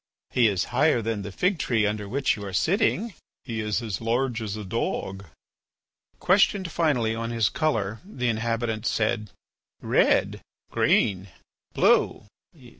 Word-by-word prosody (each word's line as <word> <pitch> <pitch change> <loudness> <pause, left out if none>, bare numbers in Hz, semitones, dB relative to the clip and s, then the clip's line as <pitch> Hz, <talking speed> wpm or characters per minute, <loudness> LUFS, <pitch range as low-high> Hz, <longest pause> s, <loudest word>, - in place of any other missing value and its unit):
"He 120 -2 +4
is 95 -4 0
higher 155 -5 +3
than 110 -2 -2
the 100 - -6
fig 180 - 0
tree 115 -6 +1
under 105 -1 -2
which 135 +3 +1
you 105 - -8
are 100 -2 -6
sitting." 200 - +1 0.3
"He 115 -4 -5
is 105 +2 -1
as 105 -4 -4
large 120 +1 0
as 105 -2 -4
a 105 - -6
dog." 95 +1 -3 0.9
Questioned 190 -1 +2
finally 130 -10 +1
on 115 0 -3
his 115 -3 +1
colour, 110 -9 -1
the 130 - -4
inhabitants 115 0 -1
said: 110 -1 -1 0.5
"Red." - - +2 0.3
"Green." 95 -1 +2 0.5
"Blue." - - +3
115 Hz, 140 wpm, -25 LUFS, 105-135 Hz, 0.9 s, He